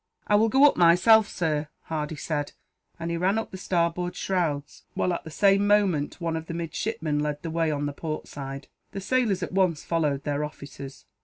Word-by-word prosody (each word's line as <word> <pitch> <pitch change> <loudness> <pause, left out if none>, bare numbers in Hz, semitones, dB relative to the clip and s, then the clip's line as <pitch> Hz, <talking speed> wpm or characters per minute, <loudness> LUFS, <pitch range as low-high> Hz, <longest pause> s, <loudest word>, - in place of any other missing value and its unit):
"I - - 0
will 220 +2 +5
go 270 +5 +6
up, 290 - +4
myself, 185 +6 +6
sir," 155 -3 -1 0.2
Hardy 155 -1 -3
said; 145 0 -3 0.5
and 165 0 -3
he 170 - -1
ran 190 +5 +1
up 225 - -3
the 190 - -7
starboard 175 -1 -1
shrouds 155 -6 -2
while, 180 - +1
at 170 - -4
the - - -7
same 200 +4 +3
moment, 195 -9 +2
one 165 -2 -2
of 160 0 -5
the 165 - -5
midshipmen 165 -2 -2
led 150 0 -2
the 165 - -4
way 165 0 +1
on 145 -1 -1
the 145 - -3
port 155 +1 -5
side. 135 -1 -7 0.3
The 195 - -4
sailors 215 -4 +1
at - - -4
once 185 -5 +1
followed 150 -5 0
their 145 0 -1
officers. 140 -2 -9
165 Hz, 205 wpm, -26 LUFS, 150-190 Hz, 0.5 s, go